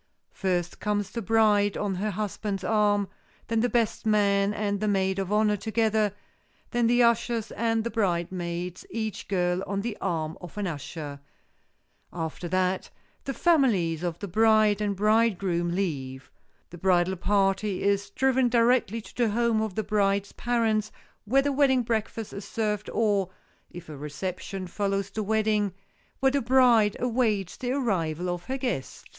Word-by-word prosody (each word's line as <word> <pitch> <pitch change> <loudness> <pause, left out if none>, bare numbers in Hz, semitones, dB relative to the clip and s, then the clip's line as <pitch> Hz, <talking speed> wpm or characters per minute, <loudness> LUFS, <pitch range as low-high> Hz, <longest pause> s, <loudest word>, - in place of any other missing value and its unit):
First, 180 -3 -2
comes 205 -2 -1
the 230 - -4
bride 210 -1 +3
on 205 -2 -1
her 200 +4 -2
husband's 205 -1 -3
arm, 205 -1 +2 0.4
then 225 0 +1
the 245 +2 +2
best 235 -3 0
man 200 -2 +3
and 205 -1 -1
the 215 - -1
maid 190 -1 +1
of 195 0 -3
honor 210 0 +3
together, 220 0 +1 0.6
then 240 -2 +2
the 245 +1 +4
ushers 235 -1 +1
and 225 -1 0
the 235 - -3
bridesmaids, 175 -2 -2
each 220 -2 -4
girl 180 -1 0
on 200 0 -2
the 225 0 -3
arm 165 -2 -2
of 180 +2 -10
an 205 - -1
usher. 150 -3 -6 0.9
After 165 +1 -5
that 185 +1 0 0.4
the 275 - -2
families 225 - +2
of 175 -2 -2
the 200 - -6
bride 215 +1 +4
and 205 -1 0
bridegroom 200 -5 +2
leave. 135 -8 -3 0.4
The 175 - -10
bridal 185 0 +2
party 195 +1 +1
is 200 0 +1
driven 260 +3 +2
directly 230 -2 +2
to - - -14
the 240 -2 +1
home 230 0 +1
of 215 -4 -3
the 220 - -1
bride's 200 -1 +1
parents, 220 -3 0 0.3
where 270 +6 +3
the 285 - +1
wedding 265 -2 +3
breakfast 225 -1 -3
is 200 - -7
served 210 -2 -2
or, 205 -4 +1 0.4
if 175 0 -10
a 155 - -8
reception 180 +6 -5
follows 195 +1 -2
the 215 - -3
wedding, 210 -2 +1 0.5
where 265 0 +4
the 280 0 +1
bride 235 -4 +4
awaits 225 -6 0
the 250 0 -3
arrival 180 - -1
of 175 0 -5
her 265 +1 -3
guests. 245 - -4
205 Hz, 160 wpm, -27 LUFS, 185-225 Hz, 0.9 s, the